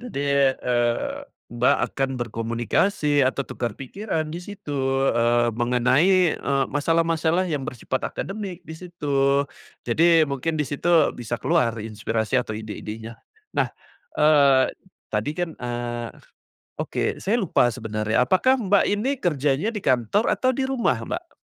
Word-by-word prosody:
Jadi, 245 Hz, -, -7 dB, 0.5 s
eee, 120 Hz, -, 0 dB, 0.3 s
Mbak, 125 Hz, +4 st, +3 dB, 0.2 s
akan 135 Hz, -1 st, -1 dB
berkomunikasi 120 Hz, -, 0 dB
atau 135 Hz, +1 st, +1 dB
tukar 115 Hz, -3 st, -4 dB
pikiran 160 Hz, -, -3 dB
di 170 Hz, -, -5 dB
situ, 195 Hz, -5 st, -8 dB, 0.4 s
eee, 120 Hz, 0 st, +2 dB
mengenai, 130 Hz, -, +3 dB
eee, 135 Hz, -1 st, +1 dB
masalah-masalah 165 Hz, +3 st, +1 dB
yang 155 Hz, -6 st, -2 dB
bersifat 130 Hz, 0 st, -3 dB
akademik 195 Hz, -3 st, -6 dB
di 160 Hz, -, -9 dB
situ. 145 Hz, -5 st, 0 dB, 0.4 s
Jadi 160 Hz, +6 st, +4 dB
mungkin 145 Hz, +3 st, -2 dB
di 150 Hz, -, 0 dB
situ 165 Hz, +4 st, +2 dB
bisa 120 Hz, 0 st, -4 dB
keluar 125 Hz, -9 st, +1 dB
inspirasi 110 Hz, +2 st, -1 dB
atau 110 Hz, -3 st, -5 dB
ide-idenya. 110 Hz, +1 st, -7 dB, 0.3 s
Nah, -, -, +1 dB, 0.5 s
eee, 140 Hz, -3 st, +5 dB, 0.4 s
tadi 105 Hz, +7 st, 0 dB
kan 175 Hz, -2 st, -2 dB
eee, 120 Hz, -1 st, -4 dB, 0.7 s
oke -, -, -2 dB
saya 220 Hz, +5 st, +1 dB
lupa 155 Hz, -, +2 dB
sebenarnya, 110 Hz, +2 st, -1 dB
apakah 260 Hz, -, +3 dB
Mbak 200 Hz, -3 st, +3 dB
ini 210 Hz, +7 st, 0 dB
kerjanya 150 Hz, -, +1 dB
di 220 Hz, -, -4 dB
kantor 130 Hz, -, +1 dB
atau 255 Hz, -, +1 dB
di 265 Hz, +1 st, -1 dB
rumah, 265 Hz, -3 st, 0 dB
Mbak? 350 Hz, -1 st, -5 dB
140 Hz, 130 wpm, -23 LUFS, 120-175 Hz, 0.7 s, eee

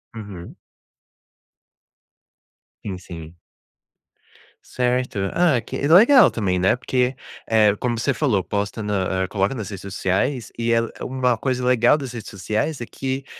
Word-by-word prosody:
Uhum. 100 Hz, -6 st, -9 dB, 2.3 s
Sim, 95 Hz, -3 st, -4 dB
sim. 80 Hz, -2 st, -10 dB, 1.3 s
Certo. 125 Hz, -3 st, -1 dB
Ah, 170 Hz, -8 st, +3 dB
que 115 Hz, -, -6 dB
legal 230 Hz, -, +7 dB
também, 95 Hz, -5 st, -1 dB
né, 95 Hz, +6 st, +2 dB
porque, 125 Hz, 0 st, 0 dB, 0.3 s
eh, 110 Hz, -2 st, +4 dB
como 120 Hz, -2 st, -1 dB
você 140 Hz, +4 st, +1 dB
falou, 115 Hz, -6 st, +1 dB
posta 100 Hz, +3 st, -3 dB
na 95 Hz, -2 st, -1 dB
eh, -, -, -2 dB
coloca 100 Hz, +4 st, 0 dB
nas 110 Hz, -6 st, -5 dB
redes 100 Hz, -2 st, -7 dB
sociais 100 Hz, +6 st, -2 dB
e 115 Hz, 0 st, 0 dB
é 115 Hz, -, +4 dB, 0.2 s
uma 125 Hz, -2 st, 0 dB
coisa 125 Hz, -2 st, -2 dB
legal 125 Hz, +2 st, +4 dB
das 135 Hz, -4 st, -6 dB
redes 115 Hz, -3 st, -7 dB
sociais, 110 Hz, -, -2 dB
é 120 Hz, -, -5 dB
que, 135 Hz, +2 st, -4 dB
115 Hz, 140 wpm, -22 LUFS, 100-130 Hz, 2.3 s, legal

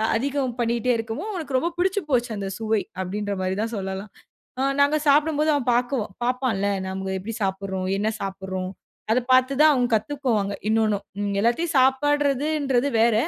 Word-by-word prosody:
அதிகம் 265 Hz, 0 st, -1 dB
பண்ணிட்டே 235 Hz, +1 st, +1 dB
இருக்கவும், 225 Hz, -, -4 dB
அவனுக்கு 310 Hz, -9 st, -2 dB
ரொம்ப 335 Hz, +7 st, 0 dB
பிடிச்சுபோச்சு 305 Hz, -, +1 dB
அந்த 200 Hz, -1 st, -3 dB
சுவை, 220 Hz, -1 st, +1 dB, 0.2 s
அப்டின்ற 205 Hz, +2 st, -3 dB
மாரி 185 Hz, 0 st, -1 dB
தான் 225 Hz, +1 st, -2 dB
சொல்லலாம். 190 Hz, +1 st, -5 dB, 0.5 s
ஆ -, -, +2 dB, 0.2 s
நாங்க 285 Hz, +2 st, +4 dB
சாப்படும்போது 300 Hz, +1 st, +3 dB
அவன் 275 Hz, -4 st, -1 dB
பாக்குவ 245 Hz, 0 st, +1 dB, 0.2 s
பாப்பான்ல, 245 Hz, -5 st, 0 dB, 0.2 s
நம்ம 190 Hz, 0 st, -4 dB
எப்டி 205 Hz, +5 st, -6 dB
சாப்ட்றோம்? 190 Hz, -1 st, -2 dB
என்ன 205 Hz, +2 st, 0 dB
சாப்ட்றோம்? 190 Hz, -1 st, -4 dB, 0.4 s
அத 235 Hz, -, +4 dB
பாத்து 255 Hz, +1 st, +5 dB
தான் 310 Hz, -, +7 dB
அவன் 250 Hz, -2 st, +2 dB
கத்துக்குவாங்க, 220 Hz, -3 st, 0 dB, 0.2 s
இன்னொன்னும். 215 Hz, -2 st, +1 dB, 0.2 s
ம் 205 Hz, -1 st, -1 dB
எல்லாத்தையும் 240 Hz, +10 st, +1 dB
சாப்பட்றதுன்றது 280 Hz, 0 st, +2 dB
வேற. 230 Hz, 0 st, +4 dB
240 Hz, 150 wpm, -24 LUFS, 200-280 Hz, 0.5 s, தான்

